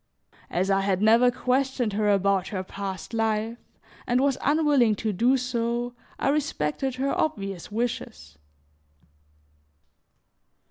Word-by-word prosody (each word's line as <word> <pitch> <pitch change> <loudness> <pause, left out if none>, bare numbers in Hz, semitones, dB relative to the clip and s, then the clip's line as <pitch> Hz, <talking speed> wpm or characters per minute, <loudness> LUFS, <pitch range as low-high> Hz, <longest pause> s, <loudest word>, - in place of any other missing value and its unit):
As 185 +3 0
I 195 0 +3
had 195 -1 0
never 230 +4 +5
questioned 255 -2 0
her 210 0 +1
about 195 -1 +2
her 190 -3 -3
past 195 +2 -6
life 225 +1 -1 0.5
and 245 +1 +2
was 275 0 +2
unwilling 290 -7 +3
to 215 +1 -2
do 245 +8 +3
so, 240 -1 -2 0.2
I - - 0
respected 270 - -1
her 270 +2 -1
obvious 195 - -2
wishes. 215 - -4
230 Hz, 120 wpm, -26 LUFS, 195-255 Hz, 0.5 s, never